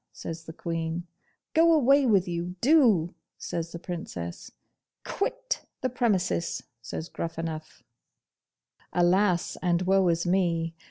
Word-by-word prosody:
says 165 0 -7
the 160 - -7
Queen. 165 0 -3 0.5
'Go 330 +1 +6
away 280 -3 +5
with 195 -5 +3
you, 175 +1 -3
do!' 230 - +4 0.2
says 170 0 -4
the 170 - -6
Princess. 165 - -6 0.5
'Quit - - -2 0.2
the 255 - 0
premises!' 200 -8 0 0.2
says 155 +6 -5
Gruffanuff. 165 -2 -5 1.1
'Alas! 180 +1 +2
and 175 0 +1
woe 190 0 +3
is 170 0 +1
me! 170 -3 +1
175 Hz, 115 wpm, -27 LUFS, 165-215 Hz, 1.1 s, Go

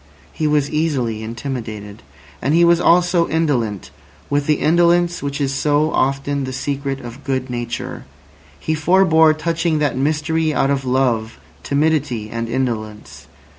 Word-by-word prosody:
He 155 - -1
was 150 -1 +1
easily 135 -8 -1
intimidated. 110 -3 -6 0.4
And 145 +4 +1
he 170 0 +5
was 170 0 +4
also 175 0 +3
indolent, 120 - -1 0.4
with 145 0 0
the 155 - +4
indolence 175 +2 +2
which 140 0 -3
is 140 -1 0
so 150 +3 +1
often 140 +1 0
the 130 - -5
secret 135 +1 -3
of 120 +3 -10
good 130 -2 -2
nature. 120 -1 -5 0.5
He 160 - -2
forbore 160 -1 +4
touching 165 0 0
that 150 -3 0
mystery 155 +3 0
out 135 - +2
of 135 -1 -1
love, 125 -4 0 0.2
timidity, 140 -7 0
and 115 0 -4
indolence. 110 -4 -4
140 Hz, 140 wpm, -19 LUFS, 125-160 Hz, 0.5 s, he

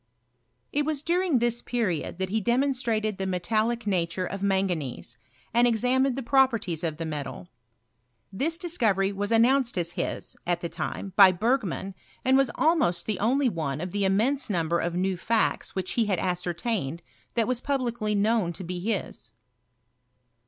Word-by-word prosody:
It 295 - +2
was 300 -1 -2
during 345 -3 +2
this 240 0 +1
period 205 -11 -2
that 190 0 -2
he 220 +1 +1
demonstrated 235 -4 0
the 190 - -1
metallic 215 +6 0
nature 180 -2 0
of 195 +2 -5
manganese, 190 -9 -1 0.4
and 240 +1 +5
examined 250 +3 +2
the 270 - -4
properties 230 - +2
of 160 -3 -2
the 165 - -4
metal. 145 - -5 0.8
This 315 +11 -1
discovery 220 - +1
was 205 +2 -3
an 225 0 +6
nounced 255 -3 +2
as 170 -1 -1
his, - - -3
at 175 -1 0
the 170 - -3
time, 170 +3 -5
by 195 -2 +9
Bergman, 195 -1 -1 0.3
and 260 +1 +4
was 270 -2 +4
almost 305 - +2
the 215 -3 -2
only 260 +6 +2
one 155 - -2
of 180 +2 -4
the 205 +1 -1
immense 235 +8 +1
number 170 -3 +1
of 170 0 -2
new 185 +1 0
facts 220 +5 0
which 185 -1 -2
he 230 -3 +1
had 195 -3 +1
ascertained 175 - -2 0.3
that 230 -2 +2
was 250 -1 -1
publicly 240 -6 -1
known 205 -3 +2
to 185 - -8
be 180 +1 -4
his. 205 0 -3
210 Hz, 165 wpm, -27 LUFS, 180-245 Hz, 0.8 s, by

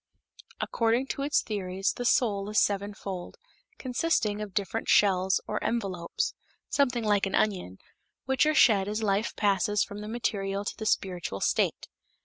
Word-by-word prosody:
According 230 +3 +1
to - - -3
its 285 +1 +1
theories, 195 -2 -2
the 245 - -5
soul 205 -5 +2
is 215 - +3
sevenfold, 200 - -2 0.4
consisting 245 -6 0
of 205 -3 -7
different 205 +2 -2
shells 190 -2 +4
or 210 - -3
envelopes 190 -7 -2 0.4
something 250 -4 +1
like 205 -2 +2
an 195 - -2
onion 185 - 0 0.5
which 265 +3 +2
are 310 - +2
shed 205 -9 +5
as 215 +2 -2
life 205 +2 0
passes 205 0 +2
from 205 +1 -8
the 210 - -7
material 200 -3 -2
to - - -3
the 220 - -4
spiritual 180 - -1
state. - - 0
205 Hz, 150 wpm, -28 LUFS, 195-230 Hz, 0.5 s, shed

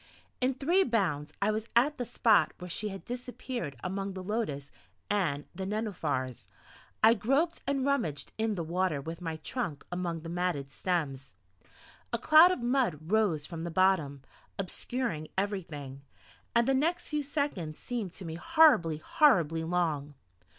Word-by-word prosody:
In 255 +1 +2
three 340 +9 +3
bounds 175 - 0
I 210 - +3
was 215 +1 -3
at 275 +4 +3
the 245 - -1
spot 225 -2 +3
where 180 - -8
she 210 - -2
had 195 -1 -8
disappeared 245 - -5
among 195 +1 -3
the 185 -1 -6
lotus 180 -10 -3 0.4
and 155 -8 0
the 190 +2 -5
nenuphars. 175 - -2 0.6
I 225 +1 +8
groped 275 +10 +1
and 275 -1 0
rummaged 175 - -1
in 220 -1 +1
the 170 - -2
water 170 -2 0
with 165 +5 -7
my 165 -2 -3
trunk 160 - -4
among 175 -2 -2
the 165 - -8
matted 170 -6 -2
stems. 135 - -2 0.8
A 235 - +1
cloud 310 +8 +7
of 365 - -2
mud 235 - 0
rose 200 -9 +2
from 165 -1 -6
the 170 - -3
bottom, 165 -6 +2 0.3
obscuring 195 -3 -3
everything, 165 -9 -3 0.5
and 235 +1 +4
the 270 - +4
next 315 +6 0
few 300 -1 0
seconds 280 - -2
seemed 235 -7 -4
to 190 - -8
me 160 - -5
horribly, 175 - +4
horribly 165 - +3
long. 160 -4 -1
190 Hz, 155 wpm, -30 LUFS, 160-240 Hz, 0.8 s, I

